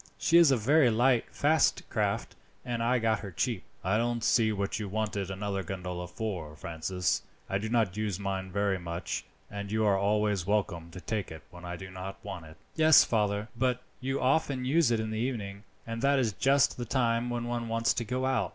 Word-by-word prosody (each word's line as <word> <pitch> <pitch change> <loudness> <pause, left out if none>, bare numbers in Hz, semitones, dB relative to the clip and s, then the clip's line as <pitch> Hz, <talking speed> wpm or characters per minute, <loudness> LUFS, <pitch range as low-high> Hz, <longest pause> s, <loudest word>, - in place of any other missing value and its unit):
"She 170 - +4
is 170 -4 +7
a 135 - +4
very 135 +4 +4
light, 120 +2 +3
fast 155 +2 +2
craft, - - -1 0.3
and 120 -2 -2
I 120 +2 +2
got 115 -2 +1
her 100 - -7
cheap." 110 +2 -1 0.2
"I 95 +4 +2
don't 120 0 -1
see 115 -3 +3
what 100 0 -2
you 105 -2 -4
wanted 105 -2 -2
another 100 0 -3
gondola 90 -1 -5
for, 90 -5 -5
Francis. 85 +4 -2 0.3
I 95 - -1
do 110 +2 -4
not 110 -6 +1
use 105 -3 -2
mine 95 -1 -3
very 100 -1 0
much, 85 0 -4 0.3
and 100 0 -5
you 110 0 +1
are 100 -2 +4
always 105 -2 +1
welcome 90 -5 -1
to 90 +2 -10
take 105 -2 -3
it 80 -1 -9
when 90 0 -11
I 90 0 -4
do 95 +2 -9
not 95 +1 -7
want 85 -3 -6
it." 80 0 -14 0.2
"Yes, 160 -1 +7
father, 105 -1 0
but 125 0 0 0.2
you 135 +1 -2
often 130 -1 +1
use 150 +1 +3
it 115 -2 +1
in 110 0 -3
the 110 - -2
evening, 105 -5 -3 0.2
and 115 0 -5
that 140 +1 +3
is 120 -5 +1
just 135 +5 +3
the 120 - -4
time 120 -1 +1
when 120 0 -2
one 120 -1 -3
wants 115 0 +2
to 120 - -2
go 125 +3 -2
out. 130 -2 +1
110 Hz, 210 wpm, -29 LUFS, 95-120 Hz, 0.3 s, is